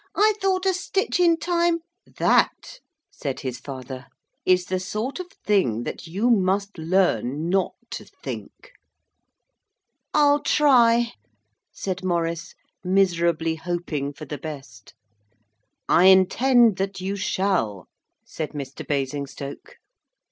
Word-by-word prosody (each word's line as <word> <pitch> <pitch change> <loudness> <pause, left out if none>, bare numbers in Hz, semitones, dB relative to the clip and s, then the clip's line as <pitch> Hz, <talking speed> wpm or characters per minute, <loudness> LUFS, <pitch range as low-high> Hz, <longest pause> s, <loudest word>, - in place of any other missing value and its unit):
'I 425 +1 +4
thought 380 -1 +1
a 380 - +3
stitch 370 +1 -1
in 340 -2 +4
time 340 0 +1 0.2
' - - -59
'That,' - - +2 0.3
said 135 -3 -5
his 125 -2 -4
father, 130 -1 -8 0.4
'is 180 -1 +4
the 185 0 -2
sort 215 - -4
of 365 - -5 0.2
thing 125 - +2
that 160 - -6
you 205 +9 +1
must 200 -1 +1
learn 160 - +1
not 190 0 +1 0.2
to - - -6
think.' - - -9 1.4
'I'll 290 -1 +5
try,' 240 -6 +4 0.6
said 190 -1 -4
Maurice, 170 -1 -2 0.3
miserably 170 -4 +2
hoping 160 -4 -3
for 155 +2 -10
the 145 0 -6
best. 135 -9 -9 0.9
'I 180 - +5
intend 220 +4 +5
that 195 0 -3
you 190 +2 -3
shall,' 185 - -1 0.4
said 155 -1 -5
Mr. 140 -2 -6
Basingstoke. 140 - -4
185 Hz, 120 wpm, -24 LUFS, 150-235 Hz, 1.4 s, I'll